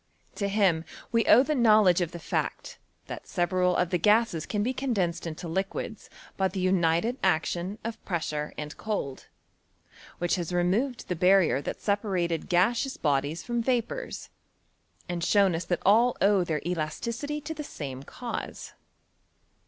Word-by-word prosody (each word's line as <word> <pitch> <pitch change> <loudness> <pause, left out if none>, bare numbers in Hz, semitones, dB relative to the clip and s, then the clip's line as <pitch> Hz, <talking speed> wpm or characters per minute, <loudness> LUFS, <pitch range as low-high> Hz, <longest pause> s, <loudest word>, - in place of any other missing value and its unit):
To 200 - -2
him 195 -5 +2 0.3
we 230 0 +2
owe 245 - +8
the 305 +2 0
knowledge 215 - +5
of 175 -1 -1
the 175 - -7
fact, 170 - -3 0.3
that - - -8
several 180 +1 +1
of 180 -1 +1
the 180 - +1
gases 210 -3 +2
can 205 -1 -1
be 255 +4 0
condensed 190 -11 -1
into 165 +2 -6
liquids 195 +4 -4 0.3
by 190 - +2
the 190 +1 -5
united 185 +5 +1
action 175 +2 0
of 230 0 -6
pressure 155 -4 -3
and 150 0 -6
cold, 200 -12 -4 0.9
which 175 +2 0
has 175 -1 -3
removed 195 +9 0
the 180 - -1
barrier 180 -4 +4
that - - -5
separated 185 -6 -1
gaseous 230 +9 +2
bodies 145 +2 0
from 240 -1 -1
vapours, 255 - -2 0.8
and 175 -1 -3
shown 195 +1 +4
us 165 +2 -3
that 175 - -2
all 230 +5 +5
owe 200 -2 +4
their 155 -4 -2
elasticity 225 - -3
to 310 +2 -5
the 305 -1 -6
same 135 - -6
cause. 240 - -6
185 Hz, 150 wpm, -27 LUFS, 170-225 Hz, 0.9 s, owe